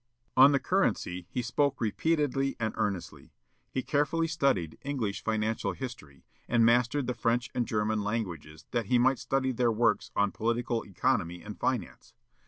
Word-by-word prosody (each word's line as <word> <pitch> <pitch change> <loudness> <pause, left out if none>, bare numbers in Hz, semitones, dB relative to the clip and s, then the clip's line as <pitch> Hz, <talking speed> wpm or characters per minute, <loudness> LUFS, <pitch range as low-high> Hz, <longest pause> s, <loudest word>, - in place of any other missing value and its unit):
On 135 +2 +8
the 140 - +4
currency 90 - 0
he 125 - -2
spoke 135 +3 0
repeatedly 135 +3 0
and 110 -1 -1
earnestly. 100 -4 -4 0.4
He 130 - -2
carefully 155 +3 +1
studied 135 - 0
English 130 -8 -3
financial 110 0 -1
history, 115 - -9 0.2
and 115 -1 +4
mastered 120 +4 +3
the 125 - -1
French 120 +1 0
and 120 - -1
German 105 0 0
languages 85 -8 -4
that 115 -4 -1
he 125 - +3
might 130 +2 +3
study 135 -1 0
their 120 -1 +2
works 115 +1 +1
on 100 -1 +2
political 115 +1 -1
economy 85 -2 -1
and 105 0 -8
finance. 130 -4 -3
120 Hz, 155 wpm, -29 LUFS, 105-135 Hz, 0.4 s, On